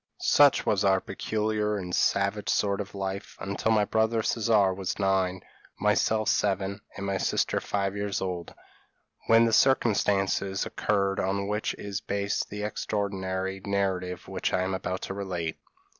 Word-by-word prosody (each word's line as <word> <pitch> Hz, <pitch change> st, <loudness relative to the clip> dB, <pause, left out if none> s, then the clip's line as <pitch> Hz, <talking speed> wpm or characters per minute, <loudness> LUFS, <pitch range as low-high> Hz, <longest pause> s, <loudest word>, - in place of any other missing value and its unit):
p> -, -, -60 dB, 0.2 s
"Such 145 Hz, -, +5 dB
was 100 Hz, -2 st, +2 dB
our 95 Hz, -1 st, +4 dB
peculiar 105 Hz, +1 st, -1 dB
and 90 Hz, -2 st, -5 dB
savage -, -, +1 dB
sort 100 Hz, 0 st, +1 dB
of 105 Hz, 0 st, -9 dB
life 95 Hz, 0 st, -5 dB
until 100 Hz, +3 st, -1 dB
my 105 Hz, -2 st, +3 dB
brother 110 Hz, +1 st, +1 dB
Caesar 105 Hz, -4 st, +2 dB
was 95 Hz, -1 st, -3 dB
nine, 95 Hz, -2 st, +1 dB, 0.4 s
myself 110 Hz, -1 st, +2 dB
seven, 100 Hz, 0 st, 0 dB, 0.2 s
and 100 Hz, -, -4 dB
my 100 Hz, -1 st, 0 dB
sister -, -, +1 dB
five 100 Hz, -1 st, -1 dB
years 100 Hz, -1 st, -2 dB
old, 90 Hz, -3 st, -4 dB, 0.7 s
when 115 Hz, +1 st, +6 dB
the 115 Hz, -, +1 dB
circumstances 100 Hz, -6 st, +2 dB
occurred 100 Hz, -2 st, 0 dB
on 100 Hz, +1 st, -1 dB
which 105 Hz, +1 st, -1 dB
is 100 Hz, -1 st, -5 dB
based 100 Hz, 0 st, -2 dB
the 105 Hz, 0 st, -5 dB
extraordinary 95 Hz, -2 st, -2 dB
narrative 95 Hz, -3 st, -2 dB
which -, -, -2 dB
I 90 Hz, -, +2 dB
am 95 Hz, +1 st, -2 dB
about 95 Hz, 0 st, -3 dB
to -, -, -4 dB
relate. 90 Hz, -5 st, -4 dB
100 Hz, 155 wpm, -27 LUFS, 95-105 Hz, 0.7 s, when